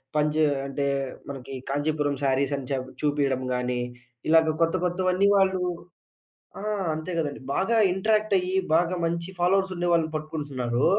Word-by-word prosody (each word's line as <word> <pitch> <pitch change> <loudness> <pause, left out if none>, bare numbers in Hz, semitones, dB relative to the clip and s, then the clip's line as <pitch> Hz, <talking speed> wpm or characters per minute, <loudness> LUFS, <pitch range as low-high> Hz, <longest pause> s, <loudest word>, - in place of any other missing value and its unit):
పని 150 0 +2
జే 155 -1 +4 0.2
అంటే, 140 +1 -1 0.4
మనకి 135 -1 -7 0.2
కాంచీపురం 145 0 0
శారీసని 135 0 0
చెప్ 130 -1 -2
చూపీయడం 140 -3 +1
గానీ, 125 0 -1 0.5
ఇలాగ 160 -1 +5
కొత్త 165 +2 +1
కొత్తవన్నీ 185 +2 +2
వాళ్ళు 190 -1 +3 1.0
ఆ! - - -7 0.3
అంతే 160 +3 -5
గదండీ, 150 -4 -2 0.2
బాగా 225 +4 +2 0.2
ఇంటరాక్టయ్యి, 195 -2 +1 0.2
బాగా 175 +2 +2
మంచి 170 +2 -2
ఫాలోవర్సుండే 185 -1 +1
వాళ్ళని 165 -2 +2
పట్టుకుంటున్నారూ. 145 -5 -2
155 Hz, 125 wpm, -26 LUFS, 140-180 Hz, 1.0 s, ఇలాగ